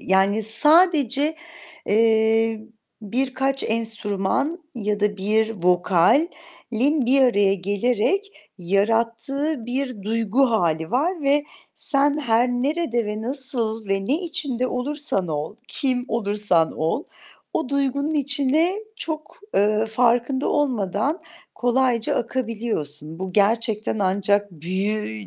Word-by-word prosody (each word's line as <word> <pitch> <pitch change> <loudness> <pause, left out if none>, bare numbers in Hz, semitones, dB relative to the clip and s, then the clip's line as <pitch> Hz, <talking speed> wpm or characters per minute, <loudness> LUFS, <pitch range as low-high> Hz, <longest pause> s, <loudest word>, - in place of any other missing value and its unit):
yani, 195 +3 +2
sadece, 295 - +4 0.5
eee, 225 0 +2 0.4
birkaç 265 +5 -1
enstrüman 225 - -1 0.2
ya 210 -3 -2
da 205 0 0
1 215 +3 +1
vokalin 255 - +1
bir 270 +2 +5
araya 205 -6 +3
gelerek 235 - -1 0.3
yarattığı 230 - -1
bir 255 -3 -2
duygu 230 +4 +1
hâli 165 -6 0
var 315 +7 0
ve 285 +1 +2 0.3
sen 285 +1 +3
her 240 -3 +2
nerede 245 -2 -1
ve 210 +1 -4
nasıl 230 -4 -2
ve 195 0 -1
ne 295 +7 +1
içinde 285 -7 -1
olursan 255 - -2
ol, 155 +7 -4
kim 255 -3 0
olursan 205 -6 +1
ol, 165 - -2 0.5
o 320 - -2
duygunun 280 +2 -1
içine 285 +4 +1 0.2
çok, 310 -1 -6 0.2
eee, 215 +2 +2
farkında 245 +4 +1
olmadan 255 - -1 0.3
kolayca 245 -2 +1
akabiliyorsun. 215 - -4
Bu 190 0 -5
gerçekten 220 +1 +1
ancak 200 +1 +1
"büyü" 175 - -3
230 Hz, 105 wpm, -22 LUFS, 205-275 Hz, 0.5 s, bir